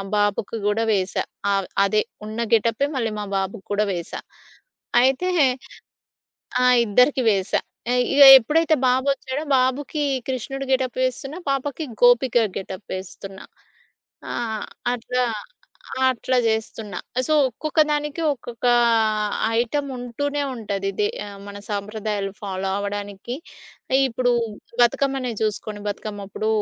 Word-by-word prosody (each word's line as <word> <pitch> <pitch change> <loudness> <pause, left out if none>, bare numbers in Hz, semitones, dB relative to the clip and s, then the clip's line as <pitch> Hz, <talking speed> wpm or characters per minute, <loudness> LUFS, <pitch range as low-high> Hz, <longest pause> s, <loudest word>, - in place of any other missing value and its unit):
బాబుకి 205 +1 0
గూడా 210 +2 +1
వేశా. 190 -2 0 0.3
అవ్ 195 -1 +1
ఆహ్, - - -14 0.2
అదే 210 +2 +2 0.2
ఉన్న 215 +2 -6
గెటపే 230 +4 +2
మళ్ళీ 230 -4 -1
మా 210 - -3
బాబుకి 195 +1 -4
గూడా 210 +1 +2
వేశా. 170 -2 -5 0.8
అయితే 265 +8 +2 1.3
ఆ! - - +4 0.2
ఇద్దరికీ 250 +6 +3
వేశా. 195 -2 +1 0.3
ఆ! - - +2 0.2
ఇగ 285 - +7 0.2
ఎప్పుడైతే 315 +6 +2
బాబొచ్చాడో, 260 +2 0
బాబుకి 275 +4 0 0.2
కృష్ణుడు 270 +2 -3
గెటప్ 260 -1 0
వేస్తున్నా. 275 +5 -3
పాపకి 280 +3 -2 0.2
గోపిక 245 0 +5 0.2
గెటప్ 190 0 -8
వేస్తున్నా. 190 +1 -9 0.9
ఆహ్, 220 -3 -3 0.3
అట్లా 250 +1 -1 0.8
అట్లా 255 0 0
జేస్తున్నా. 220 -2 -2 0.3
సో, 310 - +2
ఒక్కొక్క 310 +6 -1
దానికి 295 +1 -1
ఒక్కొక్క 240 -2 -6 0.9
ఐటమ్ 280 +4 -1
ఉంటూనే 285 +4 -3
ఉంటది. 200 -4 -3
దే 210 - +3 0.4
మన 205 0 -8
సాంప్రదాయాలు 205 -1 -3
ఫాలో 195 -1 -3
అవ్వడానికి. 205 +2 -5 0.7
ఇప్పుడు 245 +1 0 0.5
బతుకమ్మనే 265 +1 +1
చూసుకొండి. 215 0 -3
బతుకమ్మప్పుడు 205 0 -4
230 Hz, 110 wpm, -23 LUFS, 205-265 Hz, 1.3 s, ఇగ